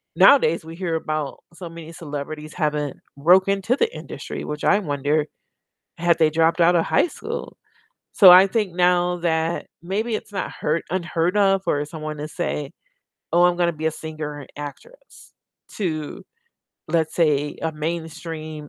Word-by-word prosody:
nowadays 170 Hz, -, +5 dB
we 165 Hz, -, -9 dB
hear 170 Hz, -2 st, -2 dB
about 155 Hz, -3 st, -3 dB
so 170 Hz, -1 st, -8 dB
many 165 Hz, -1 st, -10 dB
celebrities 150 Hz, 0 st, -7 dB
having 150 Hz, -3 st, -1 dB, 0.2 s
broke 180 Hz, +6 st, +5 dB
into 195 Hz, +5 st, +1 dB
the 465 Hz, +1 st, +1 dB
industry, -, -, -7 dB
which 150 Hz, 0 st, -5 dB
I 205 Hz, -, +4 dB
wonder, 145 Hz, -2 st, 0 dB, 0.7 s
had 170 Hz, 0 st, +2 dB
they 155 Hz, -1 st, +4 dB
dropped 165 Hz, +2 st, +2 dB
outta 170 Hz, 0 st, +5 dB
high -, -, +3 dB
school? -, -, -7 dB, 0.6 s
So 190 Hz, -4 st, +9 dB
I 185 Hz, +2 st, +9 dB
think 205 Hz, -4 st, -1 dB
now 180 Hz, 0 st, +2 dB
that 165 Hz, 0 st, -1 dB, 0.2 s
maybe 215 Hz, +5 st, -1 dB
it's 210 Hz, -, -7 dB
not 195 Hz, -, -3 dB
hur 155 Hz, +2 st, -1 dB
unheard 175 Hz, +1 st, -1 dB
of 195 Hz, -1 st, +3 dB
for 145 Hz, 0 st, 0 dB
someone 155 Hz, -1 st, -6 dB
to 150 Hz, +1 st, -5 dB
say, 150 Hz, -1 st, -4 dB, 0.6 s
"Oh, 175 Hz, +1 st, +5 dB
I'm 175 Hz, -1 st, +3 dB
gonna 170 Hz, -1 st, +1 dB
be 160 Hz, +1 st, -4 dB
a -, -, +3 dB
singer 155 Hz, -1 st, -6 dB
and -, -, -8 dB
an 145 Hz, -, -10 dB
actress," -, -, -13 dB, 0.4 s
to, 155 Hz, -7 st, -3 dB, 0.7 s
let's 160 Hz, -1 st, 0 dB
say, 150 Hz, -3 st, +1 dB
a 160 Hz, -, 0 dB
mainstream, 155 Hz, -1 st, -5 dB
165 Hz, 160 wpm, -22 LUFS, 155-180 Hz, 0.7 s, So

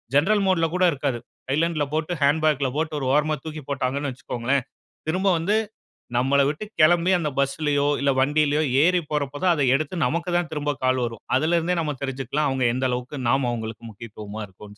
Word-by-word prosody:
General 200 Hz, +8 st, +3 dB
மோட்ல 175 Hz, -3 st, +3 dB
கூட 185 Hz, -, +1 dB
இருக்காது. 135 Hz, -4 st, -2 dB, 0.3 s
சைலன்ட்ல 155 Hz, +3 st, +1 dB
போட்டு 160 Hz, +2 st, -1 dB
ஹேண்ட் 145 Hz, +3 st, +3 dB
பாக்ல 145 Hz, -4 st, +2 dB
போட்டு 155 Hz, 0 st, -1 dB
ஒரு 135 Hz, -, -3 dB
ஓரமா 150 Hz, +1 st, +2 dB
தூக்கி 155 Hz, -1 st, -6 dB
போட்டாங்கனு 140 Hz, +1 st, -1 dB
வச்சுக்கோங்களேன். 125 Hz, +1 st, -2 dB, 0.4 s
திரும்ப 185 Hz, +4 st, 0 dB
வந்து 195 Hz, +6 st, +1 dB, 0.6 s
நம்மள 135 Hz, +3 st, +3 dB
விட்டு 155 Hz, +8 st, -3 dB, 0.2 s
கிளம்பி 175 Hz, +3 st, +5 dB
அந்த 155 Hz, -3 st, -1 dB
பஸ் 140 Hz, 0 st, 0 dB
லையோ 145 Hz, -1 st, +2 dB
இல்ல 140 Hz, 0 st, +2 dB
வண்டியிலோ 150 Hz, +2 st, +2 dB, 0.2 s
ஏறி 180 Hz, +2 st, +4 dB
போற 150 Hz, -1 st, +1 dB
போது 145 Hz, -, -7 dB
தான் 180 Hz, -, +5 dB
அத 145 Hz, -, +1 dB
எடுத்து 155 Hz, +5 st, -2 dB
நமக்கு 170 Hz, +3 st, -1 dB
தான் 175 Hz, -2 st, -1 dB
திரும்ப 150 Hz, -1 st, -1 dB
கால் 130 Hz, 0 st, +2 dB
வரும். 115 Hz, -2 st, -7 dB
அதில 160 Hz, +4 st, +2 dB
இருந்தே 175 Hz, +2 st, -1 dB
நம்ம 150 Hz, -2 st, -2 dB
தெரிஞ்சி 135 Hz, 0 st, -3 dB
கொள்ளலாம் 145 Hz, +4 st, 0 dB
அவங்க 130 Hz, -1 st, 0 dB
எந்த 130 Hz, +1 st, -1 dB
அளவுக்கு 125 Hz, +3 st, -4 dB
நாம்ம 135 Hz, -1 st, +2 dB
அவங்களுக்கு 115 Hz, -1 st, -6 dB
முக்கியத்துவமா 105 Hz, 0 st, -8 dB
இருக்றோன்னு 105 Hz, +2 st, -14 dB
145 Hz, 190 wpm, -24 LUFS, 130-160 Hz, 0.6 s, கிளம்பி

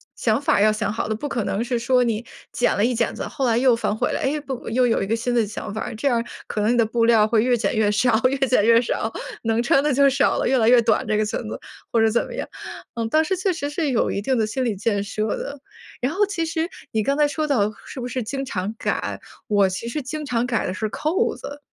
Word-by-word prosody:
想 -, -, +1 dB
法 305 Hz, +2 st, +1 dB
儿 -, -, +3 dB
要 215 Hz, 0 st, +5 dB
想 215 Hz, -1 st, -2 dB
好 225 Hz, -, -2 dB
的， 220 Hz, -, 0 dB
不 290 Hz, +7 st, -4 dB
可 235 Hz, -6 st, -2 dB
能 210 Hz, +4 st, -1 dB
是 240 Hz, -1 st, -1 dB
说 250 Hz, +1 st, +3 dB
你 230 Hz, -1 st, -1 dB, 0.3 s
剪 245 Hz, -, +1 dB
了 205 Hz, -, +3 dB
一 250 Hz, -, +1 dB
剪 230 Hz, -1 st, 0 dB
子， -, -, -5 dB
后 265 Hz, -2 st, -2 dB
来 230 Hz, 0 st, +2 dB
又 250 Hz, -1 st, +4 dB
反 230 Hz, -, -1 dB
悔 -, -, 0 dB
了， -, -, -1 dB
诶， 295 Hz, +3 st, 0 dB
不 265 Hz, -5 st, -6 dB
又 250 Hz, +2 st, +2 dB
有 230 Hz, -, +1 dB
一 195 Hz, -, -2 dB
个 225 Hz, -, +1 dB
新 240 Hz, +2 st, -2 dB
的 230 Hz, -3 st, +2 dB
想 210 Hz, 0 st, -6 dB
法 220 Hz, -, -4 dB
儿， 230 Hz, -, -5 dB
这 280 Hz, +6 st, -1 dB
样 240 Hz, -3 st, +2 dB
儿 -, -, -2 dB, 0.2 s
可 210 Hz, -, -3 dB
能 215 Hz, +3 st, +2 dB
你 -, -, +1 dB
的 230 Hz, -, +4 dB
布 230 Hz, +1 st, +1 dB
料 220 Hz, -2 st, +5 dB
会 220 Hz, -1 st, +3 dB
越 245 Hz, 0 st, +2 dB
减 210 Hz, -2 st, -1 dB
越 210 Hz, -1 st, +2 dB
少 220 Hz, +3 st, +2 dB
越 275 Hz, -, -1 dB
减 245 Hz, -5 st, +3 dB
越 230 Hz, +1 st, +6 dB
少， 225 Hz, -1 st, -2 dB, 0.3 s
能 225 Hz, +1 st, 0 dB
穿 275 Hz, +3 st, +3 dB
的 300 Hz, -, +2 dB
就 280 Hz, +2 st, +4 dB
少 275 Hz, -, +2 dB
了， -, -, 0 dB
越 265 Hz, -, +3 dB
来 225 Hz, +1 st, +4 dB
越 245 Hz, -1 st, +7 dB
短 225 Hz, -, +2 dB
这 215 Hz, -, +1 dB
个 215 Hz, -, +1 dB
裙 210 Hz, -, -2 dB
子， 110 Hz, -, -5 dB, 0.3 s
或 230 Hz, -, +2 dB
者 225 Hz, 0 st, +4 dB
怎 235 Hz, -, +2 dB
么 -, -, -8 dB
样。 -, -, -4 dB, 0.5 s
嗯， 230 Hz, -1 st, -3 dB
当 310 Hz, +4 st, +3 dB
时 380 Hz, +4 st, 0 dB
确 375 Hz, +1 st, 0 dB
实 305 Hz, -4 st, -3 dB
是 305 Hz, -1 st, -1 dB
有 245 Hz, -4 st, +1 dB
一 200 Hz, -, -2 dB
定 255 Hz, +4 st, 0 dB
的 220 Hz, -, +2 dB
心 255 Hz, +4 st, -2 dB
理 225 Hz, -4 st, 0 dB
建 205 Hz, 0 st, 0 dB
设 215 Hz, +1 st, -3 dB
的， 280 Hz, 0 st, -6 dB, 0.4 s
然 265 Hz, +5 st, 0 dB
后 410 Hz, +3 st, +2 dB
其 345 Hz, -5 st, -2 dB
实 325 Hz, +1 st, -2 dB, 0.2 s
你 220 Hz, -, +1 dB
刚 275 Hz, +6 st, 0 dB
才 300 Hz, -1 st, +4 dB
说 305 Hz, +1 st, -2 dB
到 215 Hz, -6 st, +1 dB
“是 -, -, -8 dB
不 245 Hz, -, -4 dB
是 250 Hz, +1 st, -3 dB
经 270 Hz, +4 st, -4 dB
常 200 Hz, 0 st, -3 dB
改”， -, -, -2 dB, 0.3 s
我 205 Hz, -2 st, +3 dB
其 185 Hz, +5 st, -5 dB
实 285 Hz, +3 st, -3 dB
经 305 Hz, +3 st, -5 dB
常 245 Hz, -3 st, 0 dB
改 235 Hz, -4 st, -1 dB
的 185 Hz, -, -2 dB
是 215 Hz, -, -2 dB
扣 310 Hz, -, 0 dB
子。 285 Hz, +1 st, -8 dB
235 Hz, 310 characters per minute, -22 LUFS, 220-275 Hz, 0.5 s, 越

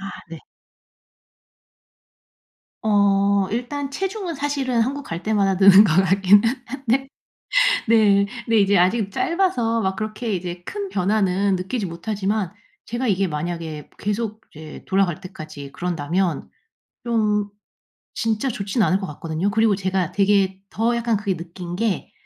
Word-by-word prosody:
아 195 Hz, 0 st, -6 dB, 0.2 s
네. 165 Hz, -, -7 dB, 2.4 s
어. 200 Hz, -2 st, +3 dB
일단 270 Hz, +5 st, -3 dB
체중은 380 Hz, +2 st, -3 dB
사실은 275 Hz, -4 st, -1 dB
한국 275 Hz, +5 st, -1 dB
갈 165 Hz, +1 st, -6 dB
때마다 200 Hz, -3 st, +1 dB
느는 195 Hz, +2 st, +8 dB
것 165 Hz, -, +2 dB
같긴 195 Hz, +2 st, +5 dB, 0.2 s
한데 265 Hz, +1 st, -1 dB, 0.8 s
네. 205 Hz, -3 st, +5 dB, 0.2 s
근데 225 Hz, -1 st, +2 dB
이제 200 Hz, 0 st, +4 dB
아직 195 Hz, +3 st, +2 dB
짧아서 335 Hz, -12 st, 0 dB
막 190 Hz, 0 st, -1 dB
그렇게 215 Hz, +2 st, -3 dB
이제 175 Hz, -1 st, -4 dB
큰 405 Hz, -1 st, -4 dB
변화는 195 Hz, -, +1 dB
느끼지 195 Hz, +4 st, -3 dB
못하지만 195 Hz, +2 st, -2 dB, 0.3 s
제가 240 Hz, +3 st, -3 dB
이게 195 Hz, -2 st, +1 dB
만약에 160 Hz, -1 st, -5 dB
계속 215 Hz, +1 st, -3 dB
이제 155 Hz, 0 st, -10 dB
돌아갈 190 Hz, -4 st, +1 dB
때까지 155 Hz, -5 st, -9 dB
그런다면 175 Hz, +1 st, -2 dB, 0.5 s
좀 210 Hz, -3 st, 0 dB, 0.6 s
진짜 225 Hz, +3 st, -1 dB
좋진 215 Hz, 0 st, -1 dB
않을 185 Hz, +3 st, +2 dB
것 190 Hz, -, -5 dB
같거든요. 160 Hz, +5 st, -3 dB
그리고 220 Hz, 0 st, +3 dB
제가 190 Hz, -3 st, -1 dB
되게 195 Hz, -2 st, +2 dB
더 230 Hz, +2 st, 0 dB
약간 235 Hz, -2 st, 0 dB
그게 200 Hz, -3 st, -2 dB
느낀 175 Hz, +1 st, -7 dB
게 210 Hz, -1 st, -2 dB
200 Hz, 265 characters per minute, -22 LUFS, 185-230 Hz, 2.4 s, 느는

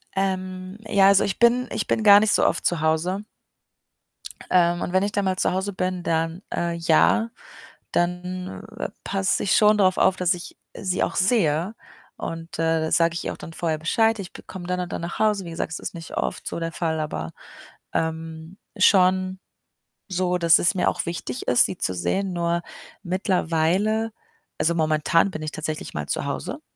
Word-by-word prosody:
Ähm, 185 Hz, 0 st, -3 dB
ja, 200 Hz, -2 st, +5 dB
also 200 Hz, -1 st, +5 dB
ich 195 Hz, -, -2 dB
bin 240 Hz, +1 st, +4 dB
ich -, -, -2 dB
bin 220 Hz, -, 0 dB
gar 205 Hz, -1 st, +9 dB
nicht 215 Hz, 0 st, +2 dB
so -, -, +3 dB
oft -, -, 0 dB
zu 170 Hz, -3 st, +1 dB
Hause. 165 Hz, +5 st, 0 dB, 1.3 s
Ähm, 175 Hz, -1 st, +3 dB
und 175 Hz, -, -3 dB
wenn 185 Hz, +1 st, +3 dB
ich 205 Hz, -, -1 dB
dann 200 Hz, -1 st, -1 dB
mal 185 Hz, -1 st, 0 dB
zu -, -, +1 dB
Hause 190 Hz, +2 st, -2 dB
bin, 185 Hz, -1 st, -2 dB
dann 165 Hz, +2 st, -1 dB
äh, 170 Hz, 0 st, -1 dB
ja, 170 Hz, +7 st, +3 dB, 0.6 s
dann, 180 Hz, +2 st, -2 dB
äh, -, -, -3 dB
passe 195 Hz, -1 st, 0 dB
ich 200 Hz, -, +2 dB
schon 210 Hz, 0 st, +5 dB
drauf 185 Hz, -2 st, +3 dB
auf, 190 Hz, -, +4 dB
dass 180 Hz, 0 st, +2 dB
ich 175 Hz, -1 st, -9 dB, 0.2 s
sie 185 Hz, -1 st, -1 dB
auch -, -, -2 dB
sehe. 185 Hz, -2 st, +1 dB, 0.4 s
Und, 165 Hz, 0 st, -6 dB
äh, 165 Hz, 0 st, +2 dB
da 160 Hz, -, -2 dB
sage 165 Hz, 0 st, +3 dB
ich -, -, -3 dB
ihr -, -, -2 dB
auch -, -, -11 dB
dann 165 Hz, -, -10 dB
vorher 160 Hz, -2 st, -1 dB
Bescheid: 225 Hz, +7 st, +2 dB
„Ich 185 Hz, -3 st, -7 dB
be -, -, -11 dB
komme 180 Hz, -2 st, -9 dB
dann 180 Hz, 0 st, -1 dB
und 180 Hz, -1 st, -4 dB
dann -, -, -3 dB
nach 170 Hz, 0 st, -5 dB
Hause.“ 210 Hz, -4 st, +2 dB
Wie -, -, -7 dB
gesagt, 165 Hz, -1 st, -3 dB
es -, -, -4 dB
ist -, -, -6 dB
nicht 165 Hz, -1 st, -8 dB
oft -, -, -2 dB
so -, -, -3 dB
der 165 Hz, 0 st, -3 dB
Fall, 160 Hz, -1 st, -2 dB
aber, 80 Hz, -, -4 dB, 0.6 s
ähm, 160 Hz, +2 st, -4 dB, 0.2 s
schon 185 Hz, -1 st, +4 dB, 0.7 s
so, 180 Hz, -1 st, 0 dB
dass 170 Hz, -2 st, +5 dB
es 180 Hz, -, +2 dB
mir 180 Hz, -, +2 dB
auch -, -, -3 dB
wichtig 170 Hz, -7 st, -5 dB
ist, 125 Hz, -, +5 dB
sie 95 Hz, -, -4 dB
zu 95 Hz, -, -1 dB
sehen. 190 Hz, -, -1 dB
Nur 170 Hz, 0 st, 0 dB, 0.4 s
mittlerweile 185 Hz, +4 st, +1 dB, 0.5 s
also, 170 Hz, +1 st, +2 dB
momentan 160 Hz, +3 st, +2 dB
bin 155 Hz, -, -6 dB
ich 155 Hz, -, -4 dB
tatsächlich 155 Hz, 0 st, -5 dB
mal 75 Hz, -1 st, -3 dB
zu -, -, -1 dB
Hause -, -, -4 dB
180 Hz, 195 wpm, -24 LUFS, 165-190 Hz, 1.3 s, gar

